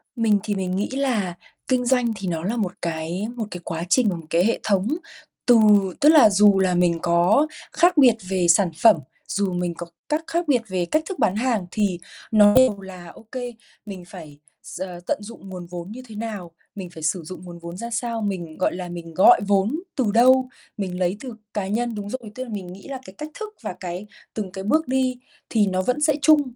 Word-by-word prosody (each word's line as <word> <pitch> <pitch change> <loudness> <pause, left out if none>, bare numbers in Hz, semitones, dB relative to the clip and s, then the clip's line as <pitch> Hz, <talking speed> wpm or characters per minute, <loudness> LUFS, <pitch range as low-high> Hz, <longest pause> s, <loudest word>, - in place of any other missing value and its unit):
Mình 220 -3 +3
thì 205 -2 -2
mình 185 -1 -2
nghĩ 200 - -1
là 250 -9 -1 0.3
kinh 255 -1 +1
doanh 245 -2 +2
thì 195 -2 -5
nó 165 -2 -2
là 220 +6 -1
một 190 -5 -1
cái 170 +4 -3
một 230 -3 -3
cái 180 - -6
quá 165 0 -4
trình, 245 +1 +4 0.2
cái 170 +3 +3
hệ 230 - +1
thống 200 -1 +1 0.6
từ 245 -2 +6 0.4
tức 295 - +7
là 300 -8 +8
dù 200 -1 +5
là 185 -2 +2
mình 175 -1 +2
có 175 - +3 0.2
khác 345 +2 +3
biệt 255 -5 +7
về 185 -2 +1
sản 175 +1 +5
phẩm, 225 -3 +8 0.3
dù 200 -2 -1
mình 175 -1 -1
có 175 - -6 0.2
cắt 305 +2 0
khác 340 0 -1
biệt 255 -5 +3
về 185 -2 -1
cách 310 - 0
thức 385 - -5
bán 190 - +2
hàng 230 -4 0
thì 200 -5 0 0.3
nó 210 -2 +6
đều 255 -6 +4
là 180 -3 -10
OK 245 +3 -8 0.4
mình 195 -3 -8
phải 155 -6 -11 0.2
s - - -9 0.3
tận - - +1
dụng 205 -3 -11
nguồn 180 -2 -7
vốn 175 +2 -7
như 250 +4 -8
thế 220 - -11
nào, 210 -6 -5 0.2
mình 190 -3 -7
phải 160 -2 -11
sử 165 +2 0
dụng 185 +3 -9
nguồn 175 -1 -10
vốn 170 +1 -8
ra 235 +4 -5
sao, 230 0 -2
mình, 180 -6 -4
gọi 185 - 0
là, 180 -1 -6
mình 170 -1 -8
gọi 185 - +6
vốn 205 +9 +2 0.2
từ 250 -7 +1
đâu 255 +2 +5 0.3
mình 185 -3 -4
lấy 180 +2 0
từ 255 -1 -7 0.2
cá 200 -3 -2
nhân 230 +3 -1
đúng 205 -1 -5
rồi, 235 -3 -6
tức 255 - -4
là 255 - -10
mình 200 -4 -5
nghĩ 195 - -13
là 275 -2 -5
cái 190 - -11
cách 300 - -6
thức 435 -1 -5
và 210 -5 -4
cái 180 +2 -6 0.3
từng 205 -4 -4
cái 190 0 -6
bước 310 +9 +1
đi 260 -1 0 0.3
thì 215 -3 +2
nó 185 -1 0
vẫn 250 +9 -1
sẽ 300 0 +4
chung 305 0 +6
205 Hz, 225 wpm, -23 LUFS, 180-245 Hz, 0.6 s, là